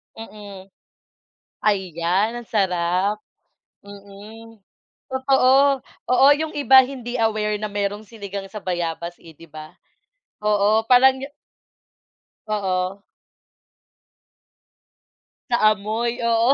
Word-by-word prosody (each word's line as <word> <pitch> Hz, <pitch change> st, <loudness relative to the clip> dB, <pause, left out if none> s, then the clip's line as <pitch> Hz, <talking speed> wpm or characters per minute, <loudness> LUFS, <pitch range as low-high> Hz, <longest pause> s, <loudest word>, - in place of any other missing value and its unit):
Mm. 205 Hz, -3 st, -11 dB, 1.0 s
Ayan, 190 Hz, 0 st, 0 dB
ang 235 Hz, -, -14 dB
sarap. 190 Hz, 0 st, 0 dB, 0.7 s
Mm 205 Hz, +3 st, -13 dB, 0.5 s
totoo. 265 Hz, +1 st, +3 dB, 0.2 s
Oo 255 Hz, +2 st, +4 dB
yung 315 Hz, 0 st, -4 dB
iba 270 Hz, -2 st, +5 dB
hindi 250 Hz, -2 st, -6 dB
aware 215 Hz, -2 st, 0 dB
na 215 Hz, -, -5 dB
merong 205 Hz, +1 st, -3 dB
sinigang 200 Hz, -3 st, -8 dB
sa 210 Hz, +1 st, -9 dB
bayabas 170 Hz, -1 st, -4 dB
eh 165 Hz, -1 st, -16 dB
'di 165 Hz, +2 st, -17 dB
ba? 155 Hz, 0 st, -11 dB, 0.7 s
Oo 210 Hz, +1 st, +2 dB
parang 260 Hz, +1 st, +6 dB, 1.4 s
Oo. 195 Hz, -2 st, -2 dB, 2.5 s
Sa 240 Hz, -, +2 dB, 0.2 s
amoy 230 Hz, +4 st, -3 dB
oo, 235 Hz, +3 st, +3 dB
210 Hz, 90 wpm, -21 LUFS, 195-235 Hz, 2.5 s, parang